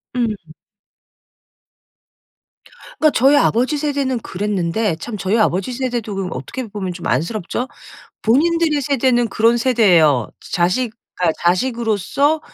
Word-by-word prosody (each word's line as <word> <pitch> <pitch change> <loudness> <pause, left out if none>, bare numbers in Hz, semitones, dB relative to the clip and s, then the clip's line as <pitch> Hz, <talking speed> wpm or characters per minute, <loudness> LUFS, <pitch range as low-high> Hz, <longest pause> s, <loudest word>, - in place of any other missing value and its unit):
음. 240 -2 +1 2.7
그러니까 310 -1 +4
저희 270 +5 +5
아버지 255 +6 +2
세대는 280 -4 -1
그랬는데 200 -1 -1
참 210 +6 -6
저희 195 +4 0
아버지 195 +2 +1
세대도 240 -5 -3
그럼 190 -2 -3
어떻게 220 - -6
보면 195 -3 -5
좀 175 - -6
안쓰럽죠? 175 - -2 0.6
본인들의 310 +5 +2
세대는 250 -3 +1
그런 230 +2 +3
세대에요. 180 - +3 0.2
자식 185 +7 +1 0.2
그러니까 170 -3 +1
자식으로서 235 - +1
230 Hz, 295 characters per minute, -19 LUFS, 185-260 Hz, 2.7 s, 저희